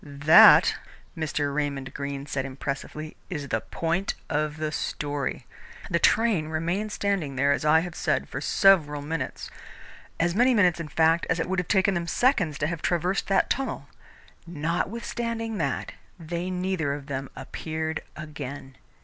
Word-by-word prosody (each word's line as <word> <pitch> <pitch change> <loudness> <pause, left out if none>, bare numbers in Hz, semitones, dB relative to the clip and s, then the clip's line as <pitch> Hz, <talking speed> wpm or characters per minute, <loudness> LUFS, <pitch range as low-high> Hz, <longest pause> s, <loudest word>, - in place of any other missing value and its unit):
"That," 140 +1 +7 0.4
Mr. 145 -3 -2
Raymond 140 -2 -3
Greene 140 -1 -5
said 135 -2 -2
impressively, 140 +3 -6
"is 145 -6 -5
the 110 - 0
point 170 +4 -2 0.2
of 150 0 -1
the 155 0 -2
story. 145 -2 -3 0.5
The 170 - +2
train 215 -9 +3
remained 170 +7 -2
standing 195 -10 -1
there, 140 +2 +2
as 140 - 0
I 160 +1 +5
have 175 0 -6
said, - - -1
for - - -5
several 150 -7 +3
minutes 160 +2 -4 0.7
as 170 +1 +2
many 245 +5 +4
minutes, 180 -5 +3
in 165 - -4
fact, 165 +2 +2
as 165 - +1
it - - -1
would 190 0 0
have 180 - -3
taken 195 0 +3
them 170 -1 -2
seconds 180 - +2
to 145 - -1
have 165 0 -3
traversed 180 +2 0
that 195 -1 +2
tunnel. 270 - -2 0.6
Notwithstanding 225 +7 -3
that, 140 -5 -2 0.3
they 170 +2 -4
neither 180 -6 -1
of 145 -1 -9
them 135 -1 -4
appeared 160 +4 -4
again. 145 -3 -8
160 Hz, 155 wpm, -26 LUFS, 145-180 Hz, 0.7 s, That